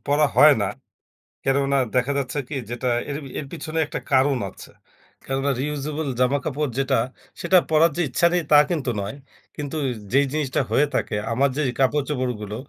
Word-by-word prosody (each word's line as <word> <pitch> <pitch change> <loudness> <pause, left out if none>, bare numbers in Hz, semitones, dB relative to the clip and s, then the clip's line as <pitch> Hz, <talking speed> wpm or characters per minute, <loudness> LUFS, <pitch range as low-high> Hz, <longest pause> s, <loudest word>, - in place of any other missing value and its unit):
পরা 145 +2 +3
হয় 150 0 +8
না - - +1 0.8
কেননা 140 +1 +2 0.2
দেখা 125 +2 +2
যাচ্ছে 130 +1 -4
কি 150 - -4
যেটা 120 +1 -3 0.2
এর 140 - -3 0.2
এর 150 - -5
পিছনে 160 -1 -4
একটা - - -5
কারণ 135 0 +4
আছে - - -13 0.5
কেননা 135 +1 -1
Reusable 150 +1 -3
জামাকাপড় 140 +3 0
যেটা 135 0 +1 0.5
সেটা 185 +2 +4
পরার 160 +1 +4
যে - - +1
ইচ্ছা 150 +7 +1
নেই 175 -1 +1
তা 150 - +9
কিন্তু 155 -7 -1
নয় 100 +4 -5 0.4
কিন্তু 145 +1 -5 0.3
যেই 140 +3 +4
জিনিসটা 145 -2 0
হয়ে 145 - +4
থাকে - - -1 0.2
আমার 135 +4 +2
যেই 150 -4 +1
কাপড় 135 +2 +2
চোপড়গুলো 125 -7 -3
140 Hz, 165 wpm, -23 LUFS, 130-150 Hz, 0.8 s, তা